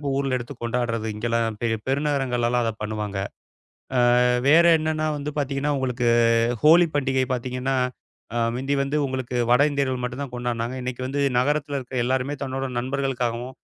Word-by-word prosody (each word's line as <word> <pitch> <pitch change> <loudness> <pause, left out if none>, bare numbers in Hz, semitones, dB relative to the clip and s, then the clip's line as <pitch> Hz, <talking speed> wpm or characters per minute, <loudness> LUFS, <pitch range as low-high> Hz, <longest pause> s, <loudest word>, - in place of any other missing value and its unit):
இப்ப 145 -2 -2
ஊர்ல 135 -2 0
எடுத்துக் 120 0 -8
கொண்டாடுறது, 115 -2 -1
இங்கெல்லாம் 115 0 -1
பெரிய 115 -1 +1
பெருநகரங்கள்லலாம் 130 -4 0
அதை 115 - 0
பண்ணுவாங்க. 105 -2 -3 0.8
ஆ - - +4 0.5
வேற 165 +4 +6
என்னன்னா 155 0 -1
வந்து 145 +1 -4
பாத்தீங்கன்னா, 140 +1 -1
உங்களுக்கு 125 -2 -1 0.6
ஹோலி 170 +3 +7
பண்டிகை 130 -2 +1
பாத்தீங்கன்னா, 130 +2 -2 0.6
அ - - 0 0.2
முந்தி 135 +3 -1
வந்து 140 +2 -1
உங்களுக்கு 130 -2 -4 0.2
வட 125 +3 +5
இந்தியர்கள் 130 -3 -1
மட்டும்தான் 125 +1 -4
கொண்டாடுனாங்க. 120 0 -3
இன்னைக்கு 125 0 -4
வந்து 140 +2 -2 0.2
நகரத்துல 145 +2 0
இருக்குற 130 0 -6
எல்லாருமே 130 +3 0
தன்னோட 135 0 -3
நண்பர்களுக்காகவும், 130 -1 -2
130 Hz, 145 wpm, -24 LUFS, 120-140 Hz, 0.8 s, ஹோலி